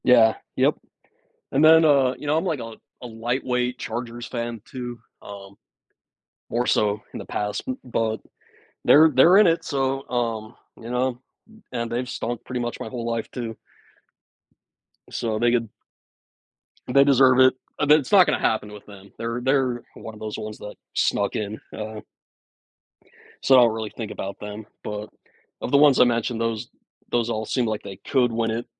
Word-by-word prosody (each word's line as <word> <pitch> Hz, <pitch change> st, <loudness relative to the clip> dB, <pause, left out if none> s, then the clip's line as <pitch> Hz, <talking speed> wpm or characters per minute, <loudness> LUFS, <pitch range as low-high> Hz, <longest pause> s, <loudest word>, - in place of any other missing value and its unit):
Yeah. 115 Hz, -3 st, +6 dB, 0.2 s
Yep. -, -, +3 dB, 0.8 s
And 140 Hz, +3 st, +2 dB
then, 160 Hz, +1 st, +7 dB
uh, 135 Hz, -4 st, +4 dB
you 150 Hz, -, -8 dB
know, 150 Hz, +2 st, +2 dB
I'm 165 Hz, -, -1 dB
like 160 Hz, -6 st, -1 dB
a 115 Hz, -1 st, -7 dB, 0.3 s
a -, -, -5 dB
lightweight 125 Hz, +2 st, -2 dB
Chargers 120 Hz, +1 st, -5 dB
fan 120 Hz, -2 st, -4 dB
too, 120 Hz, -3 st, -7 dB, 0.2 s
um, 100 Hz, -1 st, -10 dB, 1.0 s
more 120 Hz, +1 st, 0 dB
so 105 Hz, 0 st, +1 dB
in -, -, -6 dB
the -, -, -8 dB
past, 105 Hz, 0 st, -3 dB
b 260 Hz, -, -2 dB
but 115 Hz, -2 st, -1 dB, 0.7 s
they're 155 Hz, +2 st, +7 dB
they're 165 Hz, +8 st, +6 dB
in 210 Hz, -, +7 dB
it. 165 Hz, 0 st, +1 dB
So, 135 Hz, -1 st, -2 dB
um, 115 Hz, -2 st, -2 dB, 0.2 s
you 115 Hz, +1 st, -9 dB
know? 125 Hz, 0 st, -1 dB, 0.5 s
And 115 Hz, -2 st, -3 dB
they've 125 Hz, +1 st, -2 dB
stunk 120 Hz, 0 st, -4 dB
pretty 125 Hz, -1 st, -4 dB
much 120 Hz, 0 st, -3 dB
my -, -, -5 dB
whole 120 Hz, 0 st, -5 dB
life 115 Hz, -1 st, -3 dB
too. 115 Hz, -3 st, -5 dB, 1.5 s
So 110 Hz, -2 st, -2 dB
they 120 Hz, +1 st, +3 dB
could 115 Hz, -2 st, 0 dB, 1.2 s
They 140 Hz, +2 st, +5 dB
deserve 135 Hz, -2 st, +5 dB
it. 130 Hz, 0 st, +7 dB, 0.3 s
That's 150 Hz, -2 st, +4 dB
not 195 Hz, -3 st, +8 dB
gonna -, -, +1 dB
happen 105 Hz, -1 st, 0 dB
with 105 Hz, -1 st, -12 dB
them. 100 Hz, -1 st, -14 dB
They're 115 Hz, +1 st, -3 dB
they're 130 Hz, -2 st, +1 dB
one 110 Hz, -, -9 dB
of 105 Hz, -, -13 dB
those 110 Hz, -1 st, -5 dB
ones 110 Hz, 0 st, -6 dB
that 105 Hz, -, -8 dB, 0.2 s
snuck -, -, 0 dB
in, 105 Hz, 0 st, -3 dB, 0.2 s
um 110 Hz, 0 st, -6 dB, 1.4 s
So 135 Hz, -, +5 dB
I -, -, +8 dB
don't 115 Hz, -2 st, +4 dB
really 110 Hz, -1 st, -4 dB
think 110 Hz, -3 st, -5 dB
about 100 Hz, 0 st, -6 dB
them. 105 Hz, +1 st, -7 dB, 0.2 s
But 105 Hz, 0 st, -5 dB, 0.5 s
of -, -, -4 dB
the 140 Hz, -, +5 dB
ones 145 Hz, -2 st, +6 dB
I -, -, +9 dB
mentioned, 115 Hz, -1 st, 0 dB
those 115 Hz, -2 st, -2 dB, 0.4 s
those 120 Hz, -1 st, +1 dB
all 110 Hz, -1 st, -2 dB
seem 125 Hz, +2 st, 0 dB
like 110 Hz, -1 st, -3 dB
they 95 Hz, -, -8 dB
could 125 Hz, -3 st, +2 dB
win 115 Hz, 0 st, -1 dB
it 115 Hz, +2 st, -3 dB
120 Hz, 175 wpm, -24 LUFS, 110-130 Hz, 1.5 s, I